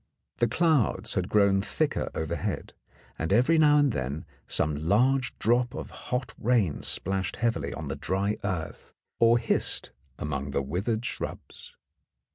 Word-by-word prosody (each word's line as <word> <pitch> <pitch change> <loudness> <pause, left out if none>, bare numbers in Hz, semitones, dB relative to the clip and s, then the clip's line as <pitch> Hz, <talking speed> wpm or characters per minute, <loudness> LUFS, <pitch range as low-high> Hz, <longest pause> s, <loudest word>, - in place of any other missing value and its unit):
The 120 - +3
clouds 155 0 +1
had - - -1
grown 100 -2 +4
thicker 145 +9 -1
overhead, 80 0 -3 0.5
and 80 - -2
every 125 +10 +4
now 150 -1 +6
and 145 -2 +4
then 70 - -3 0.2
some 75 - 0
large 125 +6 +2
drop 120 +2 +1
of - - -6
hot 125 +1 -4
rain 110 -10 +1
splashed 95 0 -1
heavily 80 - -1
on 80 - -6
the 70 - -3
dry 100 +3 -1
earth 85 -3 -4 0.2
or 115 0 +6
hissed 115 -1 0 0.3
among 70 -2 -3
the 70 - -1
withered 100 - -2
shrubs. - - -6
105 Hz, 140 wpm, -27 LUFS, 80-125 Hz, 0.5 s, now